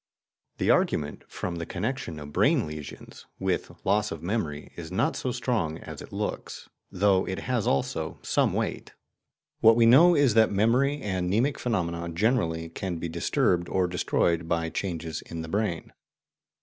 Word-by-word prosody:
The - - +2
argument - - 0
from 85 -2 -5
the 85 - -4
connection 105 - -3
of 75 0 -9
brain - - +3
lesions 75 -1 -9
with - - -1 0.2
loss 105 +2 +2
of 80 - -6
memory 85 -7 -3
is 85 -1 -8
not 95 - +1
so 130 - -2
strong 115 -10 -1
as - - -9
it - - -11
looks, - - -5 0.2
though 95 0 +2
it 95 - -3
has 125 -5 -1
also, 70 - -1
some - - +2
weight. - - -3 0.7
What 115 0 +7
we 115 0 +5
know 160 +10 +7
is 140 -6 +4
that 110 0 +5
memory, 125 +8 +2
and 95 -3 -1
mnemic 120 +9 +1
phenomena 85 -7 -2
generally, 85 -3 0
can 90 0 -4
be 85 - -4
disturbed 85 +2 +1
or 95 -1 +1
destroyed 85 -1 0
by 85 -1 0
changes 85 -4 -4
in 85 -1 -7
the - - -7
brain. 100 -3 -2
95 Hz, 160 wpm, -27 LUFS, 85-115 Hz, 0.7 s, What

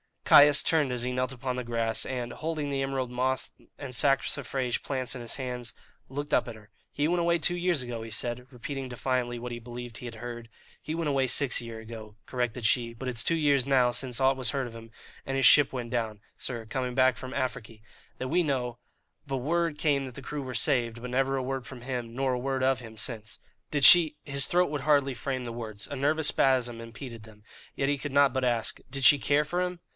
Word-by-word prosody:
Caius 145 0 +7
turned 150 -6 +2
as 120 -1 -2
he 125 - -2
knelt 125 +1 -1
upon 125 0 -4
the 125 - -2
grass, 115 -1 -1
and, 125 -2 -4
holding 155 -2 -3
the 135 -1 -1
emerald 135 -2 -2
moss 130 +1 -1 0.3
and 135 -3 -7
saxifrage 135 0 0
plants 130 -3 -3
in 130 - -7
his 120 -1 -4
hand, 125 -2 -4 0.3
looked 145 +2 -5
up - - +3
at 120 - -7
her. 105 -1 -16 0.2
"He 145 +1 0
went 175 0 +1
away 170 0 +2
two 175 +2 +1
years 175 -6 0
ago," 120 -2 -5
he 115 - -7
said, 120 +2 -3
repeating 135 +1 -6
defiantly 125 -1 -2
what 120 +1 -6
he 120 - -5
believed 120 0 -8
he - - -9
had 115 -1 -7
heard. 120 0 -8 0.3
"He 155 - -4
went 165 -2 -1
away 135 -2 +1
six 135 +1 +2
year 115 -1 -7
ago," 110 -2 -10
corrected 125 -2 -3
she; 115 +1 +2
"but 130 +3 -5
it's 120 -2 0
two 165 - +3
years 140 -4 +2
now 130 -3 +4
since 125 0 -1
aught 135 0 +3
was 130 -1 +3
heard 135 -3 -2
of 115 - -10
him, 115 0 -11 0.4
and 135 - -3
his 135 - +2
ship 145 -2 +7
went 120 -2 -4
down, 110 -4 -2 0.2
sir, 120 -3 -4
coming 125 +1 -3
back 130 -1 +4
from 130 0 -7
Afriky 115 -4 -4 0.4
that 130 - -4
we 175 +5 +3
know; 125 -6 -2 0.5
but 135 -1 -2
word 165 +4 0
came 140 -3 +1
that 130 -2 -9
the - - -8
crew 145 +2 -5
were 130 -2 -6
saved, 120 -5 +1
but 125 0 -6
never 135 +1 +1
a 130 - -1
word 130 -1 -4
from 130 -3 -10
him, 120 -2 -5
nor 135 0 0
a 125 - -1
word 135 0 -2
of 130 -1 +2
him, 110 -2 -11
since." 110 -3 -5 0.3
"Did 145 -2 -1
she" 160 +1 +9
his 140 -2 +1
throat 180 +1 +2
would 145 -2 -3
hardly 140 -2 +3
frame 130 +1 -3
the 120 - -5
words 110 -3 -5
a 140 - -6
nervous 150 +3 +5
spasm 125 -3 +1
impeded 115 0 -9
them; 105 -1 -16 0.3
yet 135 - 0
he 145 - +1
could 140 0 -6
not 140 -2 +5
but 130 -1 0
ask 120 -3 0
"did 135 -1 -3
she 135 +4 +8
care 145 +2 +2
for 175 +5 -2
him?" 180 -1 -3
130 Hz, 230 wpm, -28 LUFS, 120-140 Hz, 0.5 s, she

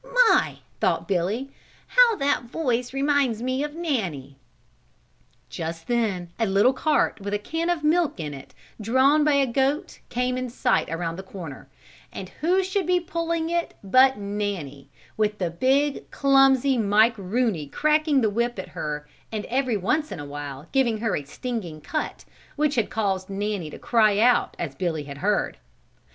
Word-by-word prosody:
"My!" - - +2 0.2
thought - - 0
Billy, 200 +8 -1 0.4
"how - - +5
that 275 -6 0
voice 245 -2 -1
reminds 270 -4 +1
me 255 +2 -1
of 295 0 -5
Nanny." 190 - -3 1.1
Just 165 0 -6
then 205 -8 -1
a 225 - +2
little 200 +7 +4
cart, 290 -5 +1
with 200 +1 -2
a - - +2
can 325 +11 -3
of 345 -3 0
milk 310 - +2
in 150 -2 -4
it, 135 -1 -11 0.3
drawn 260 +7 +4
by 300 0 +3
a 280 -1 +4
goat 270 +5 -1
came 250 +1 -1
in 255 -1 -4
sight 235 - +1
around 165 +1 -3
the - - -5
corner, 175 -8 -9 0.4
and 185 - -7
who 365 +4 +3
should 375 -1 -1
be 360 0 +3
pulling 335 -1 -2
it 340 0 -1
but 260 +6 +5
Nanny, 200 -10 -4 0.3
with 210 -1 +1
the 180 -4 -2
big, 270 - +1
clumsy 270 -1 +4
Mike 215 +2 +4
Rooney 200 - -1
cracking 305 - +2
the 220 - +2
whip 235 +2 -1
at 185 - -6
her 150 -1 -5 0.2
and 215 -2 -3
every 255 -3 0
once 295 - 0
in 190 - -5
a 145 - -6
while 145 0 -7
giving 245 -5 +2
her 220 0 -1
a 145 - -4
stinging 195 - -5
cut 310 - -4 0.3
which 300 -1 +1
had 230 -4 0
caused 195 -3 -1
Nanny 200 -4 -3
to - - -9
cry 215 -4 +3
out 240 +3 +3
as 160 -5 -4
Billy 160 0 -2
had 140 -1 -9
heard. - - 0
230 Hz, 170 wpm, -24 LUFS, 185-275 Hz, 1.1 s, how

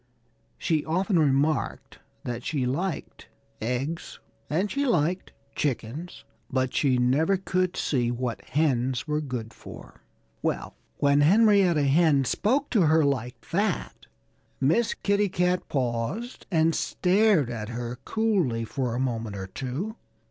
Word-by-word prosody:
She 155 -3 0
often 180 +3 +1
remarked 145 +1 0 0.2
that 120 0 -4
she 140 -5 -1
liked 160 +7 -3 0.3
eggs 130 +8 -3 0.3
and 185 +7 0
she 280 - 0
liked 180 - 0 0.2
chickens; 145 +4 -3 0.2
but 130 -1 0
she 130 -4 +2
never 145 +10 +2
could 185 -1 -1
see 125 -5 0
what 120 -1 -3
hens 130 -3 0
were 150 0 0
good 125 -6 -5
for. - - -12 0.4
Well, - - -2 0.2
when 140 0 +3
Henrietta 190 -2 +5
Hen 140 -1 +4
spoke 265 - 0
to 215 - +3
her 155 0 +4
like 125 -3 -3
that 200 0 -1 0.5
Miss 165 - +2
Kitty 200 0 +1
Cat 180 0 0
paused 130 - -2
and 165 -2 +3
stared 185 - +2
at 110 -2 -5
her 120 +1 -5
coolly 185 - 0
for 125 -1 -2
a - - -2
moment 115 -5 -2
or 95 -1 -5
two. 135 - -5
150 Hz, 130 wpm, -26 LUFS, 125-185 Hz, 0.5 s, Henrietta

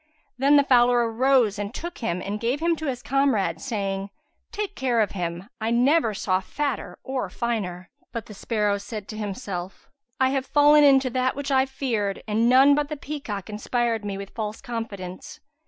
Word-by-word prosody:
Then 275 +3 +4
the 285 - +6
fowler 245 -2 +4
arose 240 -4 +3
and 205 0 -3
took 345 +1 -6
him 180 -6 -2
and 205 +2 -3
gave 240 +5 0
him 335 +1 +2
to 315 - -4
his 250 -3 -3
comrade, 275 -7 +1
saying, 200 -6 -3 0.4
"Take 420 -2 -4
care 250 -3 +1
of 210 -3 +2
him, 175 0 -4
" 235 - -41
I 220 - 0
never 245 0 +3
saw 185 -1 +1
fatter 250 -5 -3
or 265 -1 -3
finer." 190 -7 -3 0.2
But 230 -3 -5
the 210 - -11
sparrow 210 -1 0
said 210 0 -7
to 215 - -6
himself, 195 -3 -6 0.3
"I 260 0 +4
have 265 -1 -1
fallen 295 0 +6
into 270 -2 +5
that 255 +1 0
which 280 0 -4
I 265 0 +3
feared 225 -7 -2
and 220 +2 +2
none 265 +3 +7
but 295 0 0
the 300 - -4
peacock 275 -10 -5
inspired 225 +1 -1
me 200 -1 -4
with 195 0 -8
false 215 -1 -4
confidence. 210 -7 -6
235 Hz, 190 wpm, -25 LUFS, 205-270 Hz, 0.4 s, none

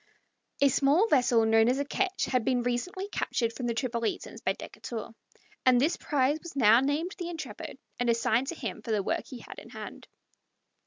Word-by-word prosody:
A 280 - +6
small 285 - +3
vessel 245 - +4
known 225 +1 +5
as 255 - +2
a 285 - -1
ketch 380 +5 -1
had 250 -3 +1
been 245 0 +1
recently 305 +11 -2
captured 230 - -1
from 245 0 -4
the 235 - -1
Tripolitans 235 -2 -3
by - - +2
Decatur, 230 -2 -7 0.5
and 255 -1 +5
this 300 +7 +2
prize 290 -1 +1
was 340 - -9
now 230 -3 +6
named 295 +7 0
the 345 -1 -3
Intrepid, 330 -2 -7 0.2
and 245 -1 +1
assigned 230 +2 +2
to 340 - -3
him 225 -7 -5
for 220 - -10
the 210 -3 +1
work - - -1
he 255 - -8
had - - -10
in - - -13
hand. - - -9
255 Hz, 195 wpm, -29 LUFS, 230-295 Hz, 0.5 s, A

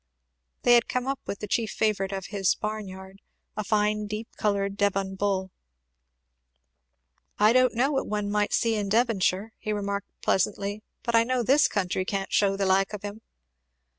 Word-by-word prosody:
They 245 - +6
had 235 -1 +5
come 250 0 -1
up 275 0 -2
with 200 - -5
the 210 - -4
chief 225 +1 0
favourite 200 -3 0
of 195 -1 -4
his 195 -2 +2
barn 215 -1 -4
yard, 190 +1 -11 0.3
a 215 - -2
fine 210 0 +1
deep 215 +2 -5
coloured 200 -1 0
Devon 195 -1 0
bull. 190 -1 -1 1.9
"I 210 +2 +5
don't 255 -1 +4
know 265 +5 +2
what 270 - -1
one 210 -1 -2
might 210 0 +1
see 230 -1 +2
in 205 -2 -1
Devonshire," 220 -2 +1
he 215 - -3
remarked 200 -1 -3
presently, 200 +2 0 0.2
"but 235 - -2
I 230 0 +6
know 250 +1 0
this 275 +6 +5
country 190 -2 -1
can't 195 0 -3
shew 195 -1 +3
the 195 - 0
like 190 +2 +2
of 210 - -6
him!" 205 +2 -6
205 Hz, 175 wpm, -26 LUFS, 195-220 Hz, 1.9 s, They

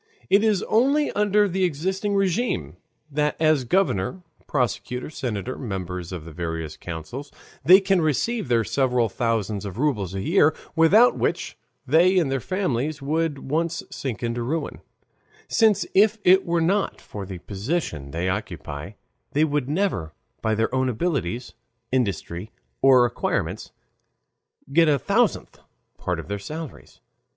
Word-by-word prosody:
It 200 +2 +5
is 215 -4 +2
only 275 +7 +2
under 205 0 +3
the 190 0 -1
existing 190 +5 -1
RÉGIME 195 - 0 0.4
that 150 +1 0
as 155 -5 +3
governor, 180 - 0 0.2
prosecutor, 125 +1 -2
senator, 125 -3 -4
members 90 -6 -5
of 85 -4 -6
the 85 - -9
various 80 -1 -4
councils, 90 - -7 0.3
they 185 +3 +8
can 195 -2 +2
receive 185 - 0
their 120 -2 +2
several 125 -1 +1
thousands 110 -4 -1
of 100 -1 -6
rubles 105 - 0
a 95 - -2
year, 160 - +3 0.2
without 200 +10 +5
which - - -1 0.3
they 170 +7 +4
and 160 -7 +2
their 135 - 0
families 150 - -1
would 155 +3 0
at 140 - -12
once 165 +3 -1
sink 125 -4 -5
into 120 0 -1
ruin, 155 +7 -3 0.7
since 215 -3 +3
if 210 +3 +5
it 185 +1 +5
were 170 0 +1
not 195 +5 +1
for 105 - -8
the 95 -1 -7
position 100 - -3
they 85 +5 -2
occupy 95 -4 -4 0.4
they 150 - +3
would 145 -3 0
never 150 - -1 0.3
by 110 -1 +1
their 115 +3 0
own 130 0 +1
abilities, 125 - -2 0.4
industry, 100 -5 -2 0.3
or 130 -2 +6
acquirements 120 - -2 1.0
get 165 0 +5
a 145 - +4
thousandth 215 - 0 0.4
part - - -2
of - - -8
their 100 +1 -3
salaries. 155 +9 -8
140 Hz, 145 wpm, -24 LUFS, -, 1.0 s, they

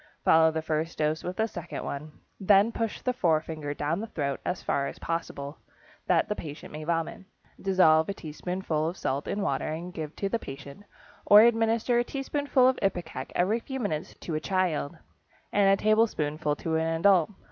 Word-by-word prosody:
Follow 160 0 +6
the 160 0 -3
first 160 +1 -2
dose 155 +1 0
with 180 +3 -5
a 220 - +2
second 175 -6 -6
one. 150 +2 -5 0.3
Then 200 +2 +5
push 225 -2 -3
the 250 - 0
forefinger 155 - -1
down 155 +5 -1
the 225 - -4
throat 140 -9 -3
as 180 - -3
far 140 0 0
as - - -7
possible, 150 -3 -4 0.5
that - - +3
the 210 - -2
patient 150 -5 -8
may 155 0 -6
vomit. 165 +2 -2 0.4
Dissolve 170 -4 +4
a - - -1
teaspoonful 160 0 -3
of 175 - -8
salt 140 +2 -2
in 205 - -2
water - - -1
and 165 +3 -5
give 155 -2 -6
to 200 - -2
the 230 +4 -1
patient, 140 +6 -10 0.4
or 205 +1 +9
administer 230 +1 +3
a - - +2
teaspoonful 275 0 +1
of 260 - +2
ipecac 175 -9 -2
every 205 +6 +2
few 265 +3 -6
minutes 165 -8 -3
to 165 - -5
a 155 - 0
child, 175 -5 -1 0.6
and 200 -1 +4
a 195 - +5
tablespoonful 155 -9 +1
to 160 +1 -1
an 165 0 0
adult. 185 -3 +4
170 Hz, 185 wpm, -28 LUFS, 155-205 Hz, 0.6 s, or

